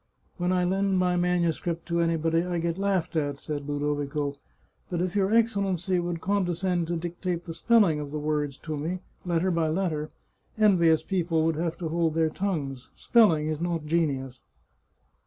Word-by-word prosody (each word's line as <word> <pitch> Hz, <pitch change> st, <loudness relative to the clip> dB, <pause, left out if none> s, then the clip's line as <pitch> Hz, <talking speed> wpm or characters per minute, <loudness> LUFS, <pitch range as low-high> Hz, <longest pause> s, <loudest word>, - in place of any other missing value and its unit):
" -, -, -39 dB
When 180 Hz, 0 st, 0 dB
I 180 Hz, -1 st, +2 dB
lend 190 Hz, +1 st, +1 dB
my 180 Hz, -1 st, +2 dB
manuscript 175 Hz, -1 st, 0 dB
to 170 Hz, 0 st, -1 dB
anybody 165 Hz, 0 st, +2 dB
I 175 Hz, 0 st, -2 dB
get 170 Hz, +1 st, -2 dB
laughed 195 Hz, -4 st, 0 dB
at," 145 Hz, -3 st, -1 dB
said 145 Hz, -2 st, -5 dB
Ludovico. 145 Hz, 0 st, -1 dB, 0.3 s
" -, -, -40 dB
But 175 Hz, -, -2 dB
if 180 Hz, +1 st, -1 dB
your 195 Hz, 0 st, +2 dB
Excellency 200 Hz, -5 st, +1 dB
would 175 Hz, -1 st, -2 dB
con 200 Hz, 0 st, +1 dB
descend 175 Hz, -1 st, -1 dB
to 170 Hz, 0 st, -1 dB
dictate 175 Hz, +1 st, -3 dB
the 165 Hz, -, -5 dB
spelling 185 Hz, -3 st, +3 dB
of 145 Hz, -1 st, -5 dB
the 150 Hz, -, -4 dB
words 150 Hz, -2 st, -1 dB
to 155 Hz, -2 st, -3 dB
me, 165 Hz, +5 st, -3 dB, 0.3 s
letter 175 Hz, +2 st, +1 dB
by 165 Hz, -2 st, +1 dB
letter, 155 Hz, -2 st, -1 dB, 0.5 s
envious 175 Hz, -7 st, +4 dB
people 170 Hz, -4 st, 0 dB
would 165 Hz, -1 st, +1 dB
have 165 Hz, +1 st, -2 dB
to 170 Hz, -3 st, -4 dB
hold 165 Hz, -1 st, 0 dB
their 160 Hz, -1 st, +2 dB
tongues. 150 Hz, -10 st, -3 dB
Spelling 170 Hz, -11 st, +4 dB
is 155 Hz, 0 st, -2 dB
not 170 Hz, -3 st, -2 dB
genius." 140 Hz, -6 st, -1 dB
170 Hz, 180 wpm, -27 LUFS, 155-180 Hz, 0.5 s, envious